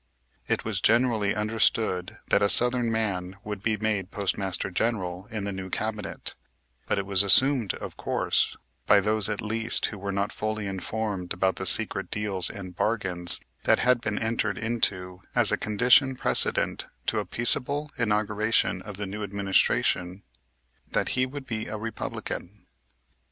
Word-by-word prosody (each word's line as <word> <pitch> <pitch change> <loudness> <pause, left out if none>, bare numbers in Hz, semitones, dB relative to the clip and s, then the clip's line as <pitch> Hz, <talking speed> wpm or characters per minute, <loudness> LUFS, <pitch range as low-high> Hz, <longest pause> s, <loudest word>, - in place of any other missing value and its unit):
It - - -1
was - - -2
generally 115 -3 +2
understood 105 -3 0
that 100 - +4
a 100 - +3
southern 120 0 +3
man 95 -4 -2
would 105 -2 -5
be 110 0 0
made 105 -3 -1
Postmaster 95 -2 -1
General 95 -3 -2
in 110 -2 -4
the 100 - -3
new 95 -1 -6
cabinet, 110 +1 -4 0.5
but - - 0
it 100 - -1
was 100 -1 +5
assumed, 120 +1 +4
of - - -8
course, - - 0 0.3
by 105 - +7
those, 105 +1 +1
at 105 - -3
least, 110 +1 +2
who 105 - -5
were 100 +1 -3
not 100 +2 -1
fully 110 0 -3
informed 95 -1 -3
about 95 +1 0
the 95 - -2
secret 100 -1 +2
deals 100 -4 -1
and 90 -3 -8
bargains 90 -6 -1 0.2
that - - +5
had 125 -1 +3
been 105 -2 -2
entered 110 -3 -1
into 95 -5 -1
as - - +4
a - - +4
condition 125 +5 +3
precedent - - +1 0.2
to - - +1
a - - -3
peaceable 140 +5 +2
inauguration 105 -1 +1
of 105 -3 -8
the 100 - -3
new 100 +2 -6
administration, 95 -2 0 0.7
that - - +1
he 130 0 +1
would 140 +1 -8
be 110 -3 -4
a 110 - -4
Republican. 105 -2 -6
105 Hz, 155 wpm, -26 LUFS, 95-115 Hz, 0.7 s, by